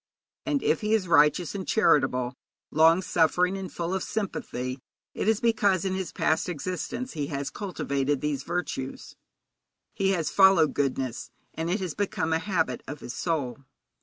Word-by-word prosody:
And 290 -3 0
if - - +2
he 215 +1 +2
is 195 -4 -1
righteous 150 +1 +4
and 195 -2 -5
charitable, 130 - +2 0.4
long 165 +4 +5
suffering 180 +3 +2
and 190 -1 -5
full 170 +1 -3
of 190 - -1
sympathy, 130 - -3 0.3
it - - -3
is 220 -1 +3
because 205 -6 +2
in 190 - 0
his 190 -3 -3
past 160 +3 0
existence 185 - -4
he 145 -4 -3
has 140 -1 -3
cultivated 145 -8 -2
these 145 -2 -2
virtues; 135 -4 -4 0.8
he 195 -1 +1
has 165 -5 -1
followed 190 -5 +5
goodness, 130 -3 -2 0.2
and 165 +1 -3
it 190 +3 0
has 180 -5 -3
become 165 -5 -1
a 160 - +2
habit 175 -3 -1
of 145 - -7
his 120 - -6
soul. 145 -7 -2
170 Hz, 165 wpm, -27 LUFS, 145-190 Hz, 0.8 s, long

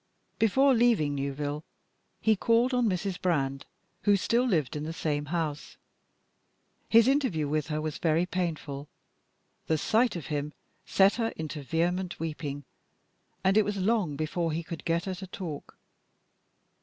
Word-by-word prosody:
Before 265 +5 +4
leaving 230 - +3
Newville 145 +2 -3 0.6
he 220 -1 +3
called 230 +5 +2
on 245 -3 +3
Mrs. 185 0 -2
Brand, 135 -6 0 0.3
who 205 -1 +4
still 235 +6 +2
lived 160 - 0
in 150 - -3
the 160 +1 -4
same 145 -1 -1
house. 155 -2 -3 1.1
His 230 +1 +6
interview 260 - +1
with 150 0 -1
her 155 -1 -2
was 155 -1 -4
very 165 +1 +2
painful. 160 -6 -3 0.8
The 160 - +2
sight 230 +8 +2
of 165 -5 -5
him 145 +1 -2 0.3
set 195 +3 +4
her 230 -2 +1
into 155 -1 -5
vehement 175 +6 -1
weeping, 150 -3 -4 0.8
and 190 +1 +3
it 215 - +6
was 205 0 -2
long 195 -6 +1
before 155 +3 -1
he 165 +2 -2
could 160 -1 -7
get 170 +1 0
her 190 - -2
to 190 +1 -8
talk. 170 -6 -7
170 Hz, 150 wpm, -29 LUFS, 150-205 Hz, 1.1 s, His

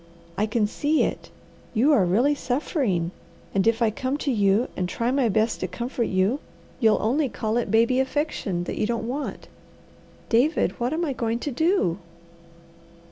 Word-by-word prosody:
I 215 - 0
can 220 0 +1
see 295 +8 +1
it! - - -3 0.5
You 270 +8 +4
are 215 - +4
really 235 +12 +3
suffering, 250 - -1 0.4
and 195 +2 +2
if 230 +1 +3
I 220 - +3
come 260 +5 -2
to 290 -2 -1
you, 205 +1 +2
and 180 -1 -2
try 235 +5 -1
my 265 -3 +2
best 220 +2 +1
to - - -2
comfort 240 -1 -3
you, 190 +8 +1 0.4
you'll 220 -4 +4
only 265 +6 +1
call 220 +1 -2
it 240 - -1
baby 230 +3 +3
affection 265 - -1
that - - -5
you 210 - +1
don't 230 -1 -2
want. 280 +4 -4 0.8
David, 255 +8 +2
what 240 +2 0
am 335 +2 0
I 280 - -1
going 230 -2 -1
to 290 - -3
do?" 315 - +1
235 Hz, 175 wpm, -24 LUFS, 215-275 Hz, 0.8 s, You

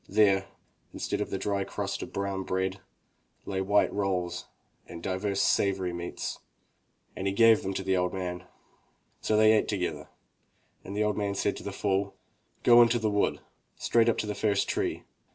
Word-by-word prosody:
There, 100 -2 +3 0.5
instead - - -2
of - - -2
the 95 - -2
dry 100 0 -1
crust - - -4
of - - -7
brown 100 -1 -2
bread, 95 +1 -2 0.7
lay 95 -1 -2
white 100 +2 +2
rolls 95 -3 -2 0.4
and 85 0 -9
divers 100 +1 -1
savory 95 -3 +1
meats, 85 0 -5 0.8
and 95 - -3
he 95 - 0
gave 115 0 +6
of - - -10
it 95 - -4
to 95 - -2
the 95 0 +1
old 90 0 +1
man. 90 -1 -4 0.8
So 110 - +1
they 110 0 +6
ate 110 - +3
together 95 -4 -3 0.7
and 100 +2 -6
the 105 - +2
old 105 0 0
man 100 -1 -1
said 100 - 0
to - - -9
the 100 - -4
fool: 100 0 -1 0.5
"Go 120 0 +8
into 120 0 +4
the 110 -2 0
wood, 105 0 0 0.3
straight 115 0 +2
up 115 - +1
to - - -1
the 105 - -2
first 100 -1 +1
tree. - - -2
100 Hz, 185 wpm, -28 LUFS, 95-105 Hz, 0.8 s, Go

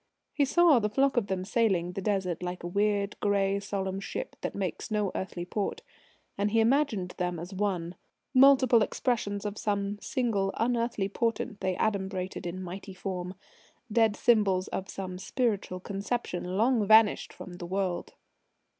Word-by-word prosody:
He 285 - +3
saw 330 -1 +5
the 210 -1 0
flock 275 +5 +2
of 235 -5 +1
them 185 -1 -2
sailing 195 -6 +1
the 195 - -5
Desert 190 -4 -1
like 180 0 -4
weird 200 +2 0
grey 200 -1 +1
solemn 195 -1 -3
ships 195 - -5
that - - -3
make 190 -4 -3
no 210 -3 0
earthly 175 -2 -4
port. 210 - -3 0.6
And 205 +1 +2
he 225 +2 +2
imagined 225 -6 +2
them 180 -1 -1
as 175 +4 -7
one: 185 -4 -1 0.4
multiple 260 -3 +6
expressions 210 -4 -1
of 205 0 -4
some 205 0 -1
single 220 -8 0
unearthly 230 -3 0
portent 215 0 -2
they 185 -1 0
adumbrated 190 -3 -2
in 185 +2 -5
mighty 190 +2 -7
form 180 -1 -4 0.6
dead 225 -1 +3
symbols 200 -6 +3
of 195 +1 -4
some 185 -2 -6
spiritual 200 -3 -1
conception 200 0 -3
long 225 -1 +3
vanished 220 0 +5
from 180 -1 -10
the 175 -2 -6
world. 185 -1 -2
200 Hz, 155 wpm, -29 LUFS, 185-225 Hz, 0.6 s, multiple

